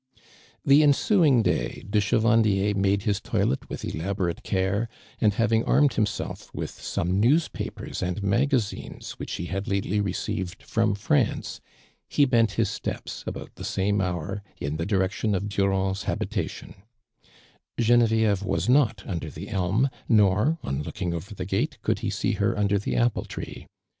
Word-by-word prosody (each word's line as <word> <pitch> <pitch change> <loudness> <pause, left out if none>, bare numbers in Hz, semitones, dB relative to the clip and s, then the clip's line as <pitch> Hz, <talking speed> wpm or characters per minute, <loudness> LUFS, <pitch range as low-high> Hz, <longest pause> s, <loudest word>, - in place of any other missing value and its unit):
The 140 +2 +7
ensuing 145 - +4
day, - - -1
de 105 +1 +2
Chevandier 105 -2 +3
made 100 0 +2
iiis 100 -1 0
toilet 70 - -1
with - - -5
elaborate 90 +1 -2
care, 100 +4 0 0.3
and 105 -2 +3
having 115 -1 +2
armed 140 -2 +4
himself 105 -2 -2
with - - -3
some 90 +3 -2
newspapers 145 +10 0
and 90 +3 -2
magazines 115 +2 0
which - - -5
he 85 - -3
had 95 +4 -4
lately 100 0 0
received 95 -1 -3
from 115 -2 +1
France, 100 -7 0 0.5
he 145 - +4
bent 115 -5 +3
his 115 -3 +1
steps, 100 - -5
about - - -6
the - - -10
same 100 +2 0
liour, 90 +1 -2 0.2
in 70 +2 -3
the 85 - -2
ilirection 100 +1 +1
of 95 +2 -2
Durand's 95 -1 0
habita - - -1
tion, - - -10 1.0
(renovieve 110 -3 +3
was 100 - -1
not 120 -6 +3
imdor 80 -5 -4
the - - -8
elm, 100 +7 +1 0.2
iioi", 105 - +4
on 70 +1 -2
looking 90 +3 -3
over 95 +6 -6
the 95 - -4
gate, 95 +1 -1
could - - +1
he - - -2
see - - 0
iier - - 0
under 100 -1 +2
the 100 - -3
ajiple 120 -2 +1
tree. - - -7
100 Hz, 155 wpm, -26 LUFS, 95-115 Hz, 1.0 s, The